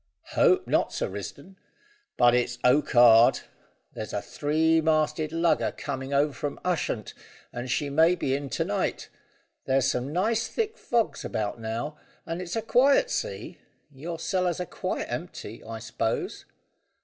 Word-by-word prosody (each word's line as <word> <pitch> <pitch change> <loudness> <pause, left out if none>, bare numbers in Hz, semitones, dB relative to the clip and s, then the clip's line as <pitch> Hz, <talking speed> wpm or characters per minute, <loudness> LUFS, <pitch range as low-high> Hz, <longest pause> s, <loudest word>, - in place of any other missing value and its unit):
"Hope - - +4
not, - - +1
Sir - - -2
Risdon; 140 - -8 0.6
but 120 0 +5
it's 120 0 +1
okkard. 120 -3 +6 0.5
There's 110 - -6
a - - 0
three 160 +2 +1
masted 155 0 +1
lugger 165 0 +1
coming 135 -1 -5
over 140 +1 +2
from 145 +1 -4
Ushant, 155 - -1 0.4
and 120 +1 -5
she 145 +3 0
may 160 +5 +4
be 135 - -1
in 140 0 -3
to - - -1
night. - - -2 0.6
There's 130 -1 +2
some 130 +1 -1
nice 220 +7 +1
thick 445 -1 -2
fogs 235 - -1
about 105 +1 -3
now, 115 +7 -4 0.3
and 165 +2 -4
it's 180 -1 -5
a 225 - -1
quiet 280 - +4
sea. - - -4 0.3
Your 160 +5 -6
cellars 180 +1 -1
are 180 - -2
quite - - -3
empty, - - -6
I 115 0 -6
s'pose?" 115 0 -3
145 Hz, 150 wpm, -27 LUFS, 125-175 Hz, 0.6 s, okkard